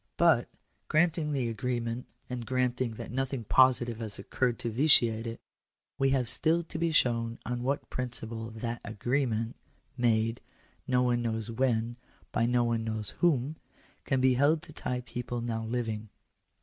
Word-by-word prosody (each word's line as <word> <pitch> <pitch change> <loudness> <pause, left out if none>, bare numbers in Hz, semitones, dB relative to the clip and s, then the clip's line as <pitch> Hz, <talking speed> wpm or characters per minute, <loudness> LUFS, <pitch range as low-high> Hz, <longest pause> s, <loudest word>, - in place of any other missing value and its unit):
But,* - - +4 0.4
granting 155 -1 +2
the 135 -4 0
agreement, 120 0 -2 0.2
and 125 -1 -4
granting 125 -1 0
that - - -7
nothing 135 -1 -2
positive 120 -1 +4
has 110 -3 -4
occurred 120 +4 -1
to 115 - -3
vitiate 115 -3 +5
it, 115 - -5 0.6
we 135 0 +3
have 130 -3 +1
still 165 +7 +2
to 160 -1 -6
be 165 0 +1
shown 115 -5 +1
on 120 +1 -2
what 135 +3 -1
principle 115 -3 -2
that 115 +1 -5
agreement, 115 0 -1 0.4
made, 115 -1 +1 0.5
no 125 -1 +3
one 120 -1 +2
knows 110 -1 -2
when, 120 -1 0 0.3
by 115 0 +1
no 120 0 +3
one 115 -1 0
knows 110 -2 -1
whom, 155 -3 +2 0.5
can 135 - +1
be 130 0 +4
held 145 +5 +3
to 165 -3 -11
tie 125 -4 -3
people 120 0 -5
now 115 -1 -2
living. 110 -2 -3
120 Hz, 155 wpm, -30 LUFS, 115-130 Hz, 0.6 s, vitiate